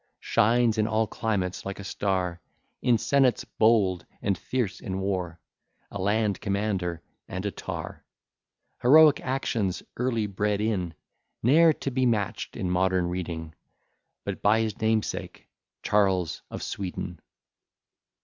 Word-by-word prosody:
Shines 115 Hz, 0 st, +2 dB
in 110 Hz, -, +2 dB
all 110 Hz, 0 st, +2 dB
climates 95 Hz, -5 st, -2 dB
like 100 Hz, 0 st, -5 dB
a -, -, -6 dB
star; 95 Hz, -3 st, -1 dB, 0.4 s
In 125 Hz, -2 st, +4 dB
senates 135 Hz, +1 st, +2 dB
bold, 100 Hz, -6 st, +2 dB, 0.2 s
and 100 Hz, -1 st, 0 dB
fierce 115 Hz, +2 st, -2 dB
in 95 Hz, 0 st, -4 dB
war; 90 Hz, -4 st, -2 dB, 0.5 s
A 100 Hz, -, -5 dB
land 105 Hz, 0 st, +1 dB
commander, 100 Hz, -5 st, -1 dB, 0.2 s
and 95 Hz, +2 st, -5 dB
a 100 Hz, -, 0 dB
tar: -, -, -6 dB, 0.8 s
Heroic 150 Hz, +3 st, +7 dB
actions 115 Hz, -7 st, -1 dB
early 115 Hz, -3 st, 0 dB
bred 100 Hz, +1 st, -1 dB
in, 95 Hz, -6 st, -1 dB, 0.5 s
Ne'er 160 Hz, +7 st, +6 dB
to 135 Hz, -, -4 dB
be 130 Hz, 0 st, +2 dB
match'd 105 Hz, -5 st, -1 dB
in -, -, -2 dB
modern 90 Hz, 0 st, +1 dB
reading, 85 Hz, -3 st, -4 dB, 0.7 s
But -, -, -4 dB
by 110 Hz, +2 st, +4 dB
his 110 Hz, -2 st, -3 dB
namesake, 110 Hz, -1 st, -1 dB, 0.4 s
Charles 95 Hz, -5 st, +1 dB
of -, -, -6 dB
Sweden. 90 Hz, -3 st, -5 dB
100 Hz, 130 wpm, -27 LUFS, 95-115 Hz, 0.8 s, Heroic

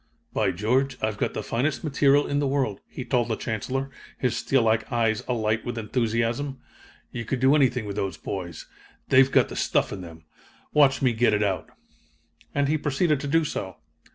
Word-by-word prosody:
"'By -, -, +2 dB
George! 125 Hz, +7 st, 0 dB
I've 110 Hz, -1 st, -2 dB
got -, -, -1 dB
the -, -, -3 dB
finest 130 Hz, +7 st, -1 dB
material 145 Hz, -1 st, +3 dB
in 145 Hz, -, 0 dB
the 145 Hz, -, +1 dB
world,'" 135 Hz, -7 st, 0 dB
he 130 Hz, -, -7 dB
told 120 Hz, -1 st, +1 dB
the 115 Hz, -, -1 dB
Chancellor, 135 Hz, +6 st, -3 dB, 0.3 s
his 125 Hz, -3 st, 0 dB
steel 135 Hz, -3 st, +2 dB
like 110 Hz, 0 st, +1 dB
eyes 115 Hz, -3 st, +1 dB
alight 110 Hz, -3 st, 0 dB
with 120 Hz, -1 st, -5 dB
enthusiasm. 115 Hz, +4 st, -1 dB, 0.5 s
'You 115 Hz, -, -4 dB
could 125 Hz, +3 st, -2 dB
do 130 Hz, +2 st, +5 dB
anything 125 Hz, -5 st, +2 dB
with 100 Hz, 0 st, -5 dB
those 95 Hz, -2 st, -2 dB
boys. 85 Hz, -5 st, -6 dB, 0.4 s
They've 135 Hz, +1 st, +6 dB
got -, -, +4 dB
the -, -, -7 dB
stuff -, -, +1 dB
in 95 Hz, -, -6 dB
them! 80 Hz, -2 st, -11 dB, 0.5 s
Watch 140 Hz, -2 st, +4 dB
me 125 Hz, -2 st, +3 dB
get 115 Hz, -1 st, +3 dB
it 105 Hz, -, +1 dB
out!' 95 Hz, -2 st, -1 dB, 0.9 s
"And 140 Hz, 0 st, +2 dB
he 155 Hz, +2 st, +1 dB
proceeded 150 Hz, +1 st, +1 dB
to 145 Hz, -, -4 dB
do 165 Hz, +2 st, +2 dB
so. 95 Hz, -9 st, -4 dB
125 Hz, 190 wpm, -25 LUFS, 110-135 Hz, 0.9 s, They've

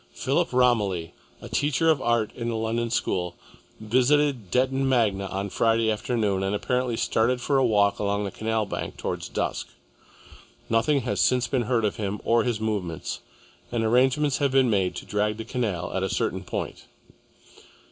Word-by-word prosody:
Philip -, -, 0 dB
Romilly, 105 Hz, -9 st, +2 dB, 0.3 s
a -, -, -6 dB
teacher 145 Hz, +2 st, +1 dB
of 145 Hz, -4 st, 0 dB
art 120 Hz, -3 st, +1 dB
in 120 Hz, -1 st, -4 dB
a 115 Hz, -, -2 dB
London 115 Hz, +1 st, -1 dB
school, 90 Hz, -6 st, -1 dB, 0.4 s
visited 130 Hz, 0 st, +2 dB
Detton 130 Hz, +5 st, +1 dB
Magna 105 Hz, -7 st, +1 dB
on 100 Hz, +1 st, -4 dB
Friday 115 Hz, -1 st, +2 dB
afternoon 105 Hz, -3 st, 0 dB
and 95 Hz, +1 st, 0 dB
apparently 125 Hz, +2 st, -1 dB
started 120 Hz, +4 st, +1 dB
for 135 Hz, +2 st, +1 dB
a -, -, +3 dB
walk 100 Hz, -3 st, +3 dB
along 100 Hz, 0 st, 0 dB
the 100 Hz, -, -3 dB
canal 110 Hz, +1 st, -1 dB
bank, 100 Hz, -, -5 dB
towards -, -, -4 dB
dusk. -, -, -2 dB, 1.0 s
Nothing 135 Hz, +5 st, +3 dB
has 125 Hz, -, -1 dB
since 125 Hz, -1 st, +3 dB
been 120 Hz, -1 st, 0 dB
heard 115 Hz, -3 st, +2 dB
of 105 Hz, -, -1 dB
him 105 Hz, -1 st, -3 dB
or 115 Hz, -1 st, +3 dB
his 120 Hz, -3 st, -1 dB
movements, 100 Hz, -7 st, -3 dB, 0.5 s
and 120 Hz, -2 st, 0 dB
arrangements 130 Hz, +4 st, +2 dB
have 140 Hz, -2 st, +2 dB
been 130 Hz, -3 st, +4 dB
made 95 Hz, -3 st, +1 dB
to -, -, -7 dB
drag 105 Hz, +1 st, -1 dB
the 110 Hz, -, -6 dB
canal 105 Hz, -8 st, -2 dB
at 95 Hz, -, -1 dB
a 95 Hz, -, -1 dB
certain 85 Hz, -, -1 dB
point. -, -, -5 dB
115 Hz, 170 wpm, -25 LUFS, 100-125 Hz, 1.0 s, been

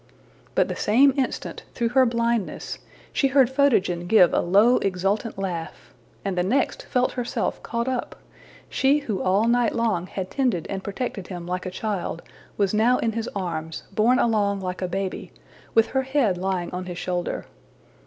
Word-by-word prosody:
'' -, -, -30 dB
But -, -, +3 dB
the -, -, -4 dB
same 265 Hz, +6 st, +4 dB
instant, 270 Hz, -2 st, -2 dB
through 235 Hz, -2 st, 0 dB
her 260 Hz, +1 st, +4 dB
blindness, 235 Hz, -2 st, -1 dB, 0.3 s
she 275 Hz, -, +3 dB
heard 265 Hz, -2 st, +4 dB
Photogen 200 Hz, -11 st, +2 dB
give 185 Hz, -4 st, +6 dB
a -, -, +3 dB
low 205 Hz, +8 st, +4 dB
exultant 195 Hz, +4 st, -1 dB
laugh, 175 Hz, -4 st, -5 dB, 0.3 s
and 195 Hz, -2 st, -1 dB
the 180 Hz, -, +1 dB
next 225 Hz, +10 st, 0 dB
felt 250 Hz, 0 st, +1 dB
herself 245 Hz, -2 st, -2 dB
caught 235 Hz, +1 st, -3 dB
up; 255 Hz, -2 st, -2 dB, 0.5 s
she 280 Hz, +2 st, +2 dB
who 200 Hz, -5 st, -2 dB
all 195 Hz, +5 st, +2 dB
night 240 Hz, -1 st, +2 dB
long 215 Hz, -7 st, 0 dB
had 185 Hz, -1 st, -5 dB
tended 245 Hz, -, 0 dB
and 195 Hz, -1 st, -4 dB
protected 200 Hz, -2 st, -4 dB
him 175 Hz, -2 st, -6 dB
like 180 Hz, +1 st, -3 dB
a -, -, -1 dB
child 185 Hz, -3 st, -3 dB, 0.3 s
was 200 Hz, -1 st, +1 dB
now 230 Hz, +4 st, +4 dB
in 230 Hz, -, 0 dB
his 230 Hz, +1 st, -3 dB
arms, 160 Hz, -4 st, -4 dB
borne 225 Hz, +5 st, +3 dB
along 205 Hz, -4 st, +2 dB
like 180 Hz, -1 st, -4 dB
a 185 Hz, -, 0 dB
baby, 190 Hz, +1 st, -4 dB, 0.4 s
with 225 Hz, 0 st, +5 dB
her 265 Hz, -, +2 dB
head 265 Hz, -7 st, +1 dB
lying 180 Hz, -1 st, -2 dB
on 180 Hz, 0 st, -5 dB
his 175 Hz, -1 st, -6 dB
shoulder. 180 Hz, -1 st, -3 dB
205 Hz, 175 wpm, -24 LUFS, 185-240 Hz, 0.5 s, give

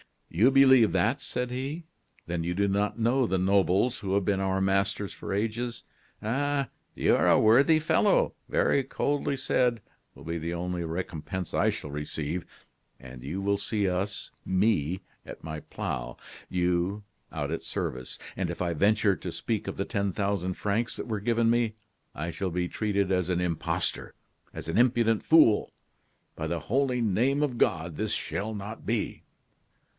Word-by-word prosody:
"You 105 Hz, +10 st, +5 dB
believe 130 Hz, -7 st, +6 dB
that!" 105 Hz, +9 st, +2 dB
said 125 Hz, 0 st, -2 dB
he; 135 Hz, +7 st, -4 dB, 0.4 s
"then 85 Hz, 0 st, -2 dB
you 90 Hz, +1 st, -2 dB
do 100 Hz, +1 st, +2 dB
not 100 Hz, +2 st, 0 dB
know 120 Hz, +2 st, +2 dB
the 95 Hz, -, +1 dB
nobles 100 Hz, +6 st, +2 dB
who 95 Hz, -4 st, -1 dB
have 100 Hz, -2 st, +1 dB
been 100 Hz, -2 st, +1 dB
our 95 Hz, 0 st, 0 dB
masters 100 Hz, +1 st, 0 dB
for -, -, -5 dB
ages. 115 Hz, +3 st, -2 dB, 0.4 s
'A., 140 Hz, +4 st, 0 dB, 0.3 s
you -, -, +3 dB
are -, -, +2 dB
a -, -, +6 dB
worthy 135 Hz, +9 st, +5 dB
fellow!' 155 Hz, -, +3 dB, 0.2 s
very 140 Hz, -, +3 dB
coldly 145 Hz, +2 st, -1 dB
said 125 Hz, -3 st, +1 dB, 0.3 s
will -, -, -13 dB
be 85 Hz, +1 st, -3 dB
the 85 Hz, +2 st, -3 dB
only 90 Hz, 0 st, -3 dB
recompense 85 Hz, +1 st, -4 dB
I -, -, +3 dB
shall 75 Hz, -, -5 dB
receive; 75 Hz, +3 st, -4 dB, 0.5 s
and 65 Hz, -1 st, -11 dB
you 85 Hz, +8 st, -4 dB
will 100 Hz, +1 st, +1 dB
see 100 Hz, 0 st, -1 dB
us, 95 Hz, +3 st, -2 dB
me, 95 Hz, -3 st, +1 dB, 0.2 s
at -, -, -10 dB
my 80 Hz, -1 st, -5 dB
plough; -, -, -5 dB, 0.3 s
you, 90 Hz, +3 st, 0 dB, 0.3 s
out 75 Hz, -2 st, -3 dB
at 80 Hz, -, -3 dB
service. 65 Hz, 0 st, -4 dB, 0.2 s
And 95 Hz, -2 st, -1 dB
if 85 Hz, -, -5 dB
I 85 Hz, -1 st, 0 dB
venture 100 Hz, +3 st, +3 dB
to -, -, -5 dB
speak -, -, -3 dB
of -, -, -4 dB
the -, -, -1 dB
ten 100 Hz, -1 st, -1 dB
thousand 100 Hz, -2 st, -1 dB
francs 105 Hz, +3 st, -1 dB
that -, -, -6 dB
were 110 Hz, -2 st, -1 dB
given 115 Hz, +2 st, +2 dB
me, 115 Hz, -2 st, +2 dB, 0.4 s
I 85 Hz, +4 st, -3 dB
shall 95 Hz, +2 st, -3 dB
be 90 Hz, +1 st, -1 dB
treated 100 Hz, -3 st, 0 dB
as 90 Hz, -1 st, +1 dB
an 90 Hz, -1 st, +1 dB
impostor, 85 Hz, -3 st, -1 dB, 0.4 s
as -, -, -7 dB
an 80 Hz, -, 0 dB
impudent 120 Hz, -3 st, +3 dB
fool. 155 Hz, -10 st, +5 dB, 0.6 s
By -, -, -3 dB
the -, -, -2 dB
holy 130 Hz, 0 st, +1 dB
name 120 Hz, +7 st, +2 dB
of 130 Hz, -5 st, -2 dB
God 85 Hz, -7 st, +1 dB
this -, -, -1 dB
shall 110 Hz, +2 st, -2 dB
not 105 Hz, +2 st, -7 dB
be!" 115 Hz, -1 st, -2 dB
100 Hz, 170 wpm, -28 LUFS, 90-115 Hz, 0.6 s, believe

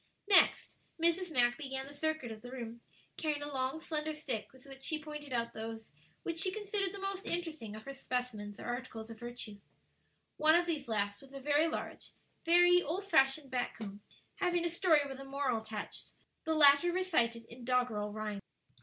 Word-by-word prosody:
Next, 395 Hz, -2 st, +5 dB, 0.2 s
Mrs. 340 Hz, +2 st, +2 dB
Mack 240 Hz, 0 st, +3 dB
began 270 Hz, -2 st, -3 dB
the 280 Hz, -, -10 dB
circuit 315 Hz, -4 st, -2 dB
of 215 Hz, -1 st, -8 dB
the 245 Hz, -, -9 dB
room, 235 Hz, -2 st, -7 dB, 0.4 s
carrying 300 Hz, -2 st, -1 dB
a 290 Hz, 0 st, -5 dB
long 265 Hz, +3 st, -1 dB
slender 310 Hz, -1 st, -2 dB
stick 265 Hz, -8 st, -3 dB
with 260 Hz, 0 st, -17 dB
which 270 Hz, -1 st, -11 dB
she 310 Hz, +3 st, 0 dB
pointed 300 Hz, -2 st, -8 dB
out 235 Hz, -1 st, -1 dB
those 225 Hz, 0 st, -6 dB, 0.3 s
which 335 Hz, -1 st, -3 dB
she 375 Hz, -, +3 dB
considered 405 Hz, -1 st, -1 dB
the 400 Hz, -, -7 dB
most 390 Hz, 0 st, -4 dB
interesting 315 Hz, -11 st, -3 dB
of 215 Hz, -, -9 dB
her 275 Hz, -, -7 dB
specimens 245 Hz, -6 st, -3 dB
or -, -, -7 dB
articles 240 Hz, -2 st, -5 dB
of 225 Hz, -, -10 dB
virtu. 240 Hz, -4 st, -7 dB, 0.8 s
One 310 Hz, +1 st, +6 dB
of 345 Hz, 0 st, +4 dB
these 310 Hz, -6 st, -2 dB
last 205 Hz, -2 st, -1 dB
was 275 Hz, 0 st, -16 dB
a 275 Hz, -, -6 dB
very 295 Hz, +3 st, +3 dB
large, 325 Hz, -, -5 dB, 0.3 s
very 355 Hz, +1 st, +6 dB
old 365 Hz, +5 st, -3 dB
fashioned 270 Hz, -5 st, +3 dB
back 250 Hz, -1 st, -1 dB
comb, 205 Hz, -2 st, -7 dB, 0.4 s
having 350 Hz, -3 st, +1 dB
a -, -, +2 dB
story 335 Hz, -3 st, +4 dB
with 270 Hz, -1 st, -7 dB
a -, -, -7 dB
moral 270 Hz, -4 st, -1 dB
attached, 220 Hz, -1 st, -6 dB, 0.3 s
the 320 Hz, 0 st, +1 dB
latter 290 Hz, +3 st, +7 dB
recited 240 Hz, -11 st, +1 dB
in 235 Hz, +2 st, -12 dB
doggerel 240 Hz, -4 st, +1 dB
rhyme. 210 Hz, -1 st, -4 dB
275 Hz, 190 wpm, -34 LUFS, 235-320 Hz, 0.8 s, latter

